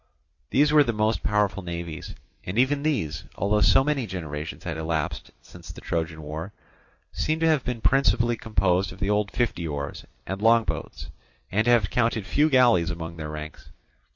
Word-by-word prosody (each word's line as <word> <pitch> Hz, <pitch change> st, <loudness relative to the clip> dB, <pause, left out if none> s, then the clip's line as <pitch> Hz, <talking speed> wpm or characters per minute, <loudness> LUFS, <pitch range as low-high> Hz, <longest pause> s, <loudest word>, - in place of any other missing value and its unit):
These 150 Hz, +3 st, +3 dB
were 150 Hz, -1 st, +7 dB
the 120 Hz, -4 st, -1 dB
most 110 Hz, +1 st, 0 dB
powerful 105 Hz, -2 st, +1 dB
navies. 85 Hz, -2 st, -6 dB, 0.3 s
And 90 Hz, +4 st, -5 dB
even 135 Hz, +3 st, +2 dB
these, 95 Hz, -, -1 dB
although 105 Hz, +1 st, +1 dB
so 135 Hz, -, +5 dB
many 140 Hz, -4 st, -1 dB
generations 80 Hz, -4 st, -6 dB
had 85 Hz, -3 st, -4 dB
elapsed 80 Hz, -1 st, -3 dB
since -, -, -12 dB
the -, -, -10 dB
Trojan 80 Hz, -1 st, -3 dB
war, 80 Hz, +6 st, -6 dB, 0.6 s
seem 155 Hz, +1 st, -1 dB
to 165 Hz, -, +1 dB
have 155 Hz, -5 st, +3 dB
been 125 Hz, -3 st, -4 dB
principally 120 Hz, -2 st, +3 dB
composed 95 Hz, -4 st, 0 dB
of -, -, -12 dB
the 100 Hz, 0 st, 0 dB
old 105 Hz, -1 st, +1 dB
fifty 105 Hz, -9 st, -1 dB
oars 70 Hz, -2 st, -5 dB, 0.2 s
and 95 Hz, +2 st, -5 dB
long 115 Hz, +1 st, +5 dB
boats, 70 Hz, -7 st, -6 dB, 0.4 s
and 110 Hz, +3 st, +1 dB
to -, -, +2 dB
have 115 Hz, -4 st, +3 dB
counted 115 Hz, -3 st, +1 dB
few 145 Hz, +8 st, +2 dB
galleys 120 Hz, -, +4 dB
among 85 Hz, -1 st, -6 dB
their 80 Hz, -2 st, -5 dB
ranks. 75 Hz, 0 st, -8 dB
100 Hz, 180 wpm, -25 LUFS, 85-120 Hz, 0.6 s, were